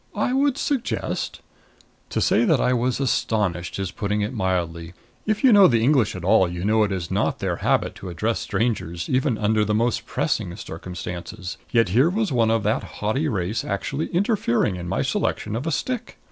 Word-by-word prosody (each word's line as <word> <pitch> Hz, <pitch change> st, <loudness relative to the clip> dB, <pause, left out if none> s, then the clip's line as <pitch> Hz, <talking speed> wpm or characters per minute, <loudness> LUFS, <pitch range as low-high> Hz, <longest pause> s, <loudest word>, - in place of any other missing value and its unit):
I 250 Hz, -, 0 dB
would 275 Hz, 0 st, +2 dB
suggest 280 Hz, -6 st, -2 dB, 0.3 s
" -, -, -33 dB
To -, -, -1 dB
say -, -, +3 dB
that 160 Hz, -, +3 dB
I 125 Hz, -, +2 dB
was 125 Hz, +1 st, 0 dB
astonished 105 Hz, -, 0 dB
is 95 Hz, -2 st, -3 dB
putting 105 Hz, +2 st, -2 dB
it 105 Hz, +5 st, -2 dB
mildly. 85 Hz, -5 st, -2 dB, 0.3 s
If 215 Hz, +3 st, 0 dB
you 255 Hz, -4 st, +7 dB
know 200 Hz, -2 st, +8 dB
the 115 Hz, -3 st, +2 dB
English 130 Hz, -7 st, +3 dB
at 90 Hz, -, -7 dB
all, 95 Hz, -1 st, +4 dB
you 90 Hz, +1 st, -4 dB
know 110 Hz, +1 st, +3 dB
it 105 Hz, -, 0 dB
is 90 Hz, -3 st, -3 dB
not -, -, 0 dB
their -, -, -2 dB
habit -, -, +1 dB
to 95 Hz, -, -7 dB
address 110 Hz, +7 st, -1 dB
strangers, 85 Hz, -8 st, -2 dB
even 130 Hz, -2 st, +1 dB
under 105 Hz, 0 st, +2 dB
the 105 Hz, 0 st, 0 dB
most 115 Hz, +2 st, 0 dB
pressing 85 Hz, -, -1 dB
circumstances. 90 Hz, +2 st, -7 dB
Yet 115 Hz, -5 st, +3 dB
here 125 Hz, -, +4 dB
was 210 Hz, 0 st, -1 dB
one 115 Hz, -3 st, +2 dB
of 115 Hz, -2 st, +1 dB
that 105 Hz, +1 st, +1 dB
haughty 130 Hz, +9 st, -2 dB
race 100 Hz, -3 st, -1 dB
actually 140 Hz, +10 st, -2 dB
interfering 175 Hz, -, +1 dB
in 90 Hz, -1 st, -6 dB
my 95 Hz, -, 0 dB
selection 105 Hz, +1 st, -1 dB
of 125 Hz, +8 st, -3 dB
a -, -, 0 dB
stick. 255 Hz, +9 st, -3 dB
110 Hz, 195 wpm, -23 LUFS, 95-135 Hz, 0.3 s, know